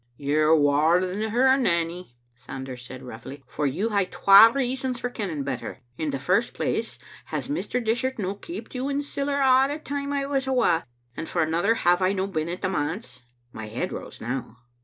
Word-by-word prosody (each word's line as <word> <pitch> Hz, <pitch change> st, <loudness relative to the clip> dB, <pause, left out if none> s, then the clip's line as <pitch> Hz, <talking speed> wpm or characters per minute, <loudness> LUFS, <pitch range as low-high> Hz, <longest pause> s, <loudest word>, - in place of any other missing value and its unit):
"You're 155 Hz, +2 st, +3 dB
waur 150 Hz, +4 st, +4 dB
than 190 Hz, +4 st, -2 dB
her, 260 Hz, +4 st, +4 dB
Nanny," 170 Hz, -, -1 dB, 0.2 s
Sanders 125 Hz, +1 st, -8 dB
said 130 Hz, +1 st, -9 dB
roughly, 130 Hz, +3 st, -9 dB
" -, -, -40 dB
for 150 Hz, -, +1 dB
you 190 Hz, -, -1 dB
hae 200 Hz, -3 st, +2 dB
twa 200 Hz, +4 st, +7 dB
reasons 260 Hz, -1 st, -2 dB
for 245 Hz, -, -3 dB
kenning 175 Hz, -, -3 dB
better. 135 Hz, -1 st, -5 dB
In 155 Hz, +3 st, -2 dB
the 140 Hz, -, -2 dB
first 185 Hz, -, 0 dB
place, -, -, -2 dB, 0.3 s
has -, -, -4 dB
Mr. 250 Hz, -4 st, -2 dB
Dishart 245 Hz, +4 st, 0 dB
no 195 Hz, -3 st, -2 dB
keeped 335 Hz, -, -9 dB
you 260 Hz, +2 st, -2 dB
in 285 Hz, +1 st, -1 dB
siller 280 Hz, 0 st, -2 dB
a' 265 Hz, 0 st, +5 dB
the 290 Hz, +2 st, -3 dB
time 285 Hz, -2 st, -4 dB
I 280 Hz, -1 st, -1 dB
was 275 Hz, -1 st, -1 dB
awa? 235 Hz, -11 st, +2 dB, 0.3 s
and 160 Hz, -, -6 dB
for 170 Hz, -, +1 dB
another, 170 Hz, +8 st, +1 dB
have 175 Hz, -4 st, +2 dB
I 185 Hz, +1 st, +2 dB
no 190 Hz, -1 st, -1 dB
been 165 Hz, -4 st, -3 dB
at 180 Hz, +2 st, -6 dB
the 185 Hz, -, +1 dB
manse?" 160 Hz, -, -3 dB, 0.3 s
My 110 Hz, -1 st, -7 dB
head 110 Hz, -, -3 dB
rose -, -, -8 dB
now. 120 Hz, 0 st, -5 dB
185 Hz, 200 wpm, -25 LUFS, -, 0.3 s, twa